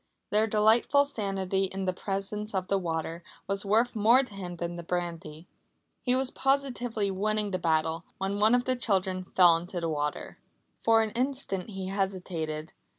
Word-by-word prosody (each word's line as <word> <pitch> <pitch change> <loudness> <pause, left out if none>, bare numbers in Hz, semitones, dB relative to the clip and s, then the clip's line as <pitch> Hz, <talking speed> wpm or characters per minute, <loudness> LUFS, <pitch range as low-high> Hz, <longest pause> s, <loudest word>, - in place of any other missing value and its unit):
Their 215 +1 +3
delightful 220 +7 +4
sanity 195 -6 -1
in 190 0 -3
the 185 - 0
presence 200 +2 -3
of 185 0 -2
the 195 - +2
water 165 -1 -3 0.2
was 195 0 -1
worth 230 +4 +2
more 230 +5 +5
to 250 - -11
him 180 -3 -6
than 170 0 -4
the 170 - -5
brandy. 170 -2 -4 0.5
He 250 0 +2
was 260 0 0
positively 245 -6 0
winning 210 +1 -1
the 185 - -1
battle, 160 -1 +1
when 195 +1 -2
one 215 +3 +5
of 245 0 +1
the 255 - +1
children 190 -5 0
fell 175 -3 +7
into 175 +2 -5
the 165 -1 -2
water. 150 -1 -3 0.4
For 225 0 +5
an 220 - -3
instant 250 -7 -2
he 190 -2 -5
hesitated. 180 -6 -3
195 Hz, 170 wpm, -28 LUFS, 175-220 Hz, 0.5 s, fell